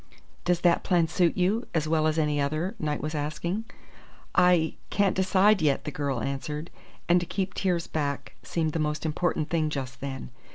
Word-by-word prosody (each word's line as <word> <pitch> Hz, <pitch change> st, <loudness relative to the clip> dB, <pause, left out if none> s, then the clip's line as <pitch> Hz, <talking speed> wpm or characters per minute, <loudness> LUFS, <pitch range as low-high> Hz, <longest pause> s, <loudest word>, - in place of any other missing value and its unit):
"Does 175 Hz, -1 st, +2 dB
that 175 Hz, -1 st, +3 dB
plan 175 Hz, -3 st, +3 dB
suit 175 Hz, +1 st, +2 dB
you 200 Hz, +7 st, +1 dB
as 155 Hz, -1 st, +1 dB
well 155 Hz, 0 st, +2 dB
as 155 Hz, 0 st, 0 dB
any 150 Hz, -2 st, +1 dB
other?" 155 Hz, +7 st, -1 dB
Knight 150 Hz, -1 st, -1 dB
was 155 Hz, +1 st, -3 dB
asking. 170 Hz, +8 st, -2 dB, 0.7 s
"I 180 Hz, -3 st, +4 dB, 0.2 s
can't 200 Hz, -2 st, +2 dB
decide 190 Hz, +1 st, +4 dB
yet," 145 Hz, -3 st, +2 dB
the 150 Hz, -, -4 dB
girl 140 Hz, -5 st, -2 dB
answered; 150 Hz, +4 st, -4 dB, 0.4 s
and 175 Hz, +1 st, +5 dB
to 175 Hz, -, -3 dB
keep 190 Hz, 0 st, -2 dB
tears 175 Hz, -3 st, 0 dB
back 145 Hz, -3 st, -3 dB
seemed 160 Hz, -2 st, -1 dB
the 165 Hz, -, -1 dB
most 150 Hz, +1 st, -1 dB
important 160 Hz, 0 st, -1 dB
thing 160 Hz, -2 st, +1 dB
just 135 Hz, -3 st, -5 dB
then. 135 Hz, -2 st, -5 dB
160 Hz, 180 wpm, -27 LUFS, 150-180 Hz, 0.7 s, and